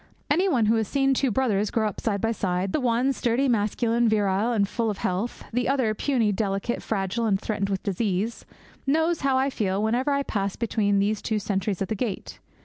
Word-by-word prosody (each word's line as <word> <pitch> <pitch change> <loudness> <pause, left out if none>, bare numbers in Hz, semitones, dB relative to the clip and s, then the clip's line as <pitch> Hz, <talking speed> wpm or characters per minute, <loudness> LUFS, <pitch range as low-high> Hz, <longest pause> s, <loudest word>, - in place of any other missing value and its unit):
Any 365 +6 +3
one 245 -9 +2
who 225 +2 +3
has 220 -2 0
seen 270 +2 +2
two 265 0 +1
brothers 215 -4 +1
grow 220 -2 +1
up 210 - -5
side 200 -3 -1
by 225 - +1
side 190 -3 -1
the - - +2
one 250 +1 +1
sturdy, 250 +2 +1
masculine, 230 +1 +1
virile, 205 +1 +1
and 205 -4 +2
full 230 +2 -1
of 205 - -3
health; 190 +7 -2
the 245 +1 0
other, 255 -6 +1
puny, 230 -2 +1
delicate, 195 +3 -1
fragile, 220 +2 -1
and 195 -2 +2
threatened 200 -2 -2
with 195 -1 -2
disease 200 +2 -1 0.4
knows 320 +4 +2
how 270 -2 +2
I 270 +1 +1
feel 200 -4 -1
whenever 245 +6 +1
I 280 0 +1
pass 200 -6 -2
between 210 -4 +1
these 205 +1 +1
two 220 - -1
sentries 195 -1 -1
at - - -4
the - - -2
gate. 210 -2 -4
220 Hz, 210 wpm, -25 LUFS, 200-245 Hz, 0.4 s, Any